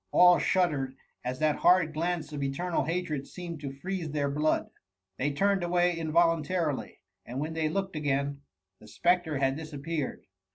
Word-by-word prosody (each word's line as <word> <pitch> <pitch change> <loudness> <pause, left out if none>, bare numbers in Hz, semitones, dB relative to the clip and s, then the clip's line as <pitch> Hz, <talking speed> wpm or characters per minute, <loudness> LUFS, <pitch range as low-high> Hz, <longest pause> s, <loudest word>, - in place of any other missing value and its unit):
All 180 -2 +7
shuddered 145 -9 +1 0.3
as 125 +1 -3
that 155 0 +2
horrid 175 -3 +4
glance 165 -1 -2
of 145 - -4
eternal 140 +3 -1
hatred 160 -4 -2
seemed 170 -3 -7
to 140 -2 -4
freeze 175 +4 -4
their 145 -1 -1
blood. 150 +2 +1 0.5
They 145 +3 +1
turned 195 +6 +2
away 175 0 +2
involuntarily; 165 -1 +1 0.2
and 125 +3 -5
when 155 +2 -3
they 160 -1 0
looked 195 +1 -2
again, 140 -1 -1 0.4
the - - -15
spectre 175 -4 +1
had 135 0 +1
disappeared. 155 -1 -4
155 Hz, 155 wpm, -29 LUFS, 140-175 Hz, 0.5 s, All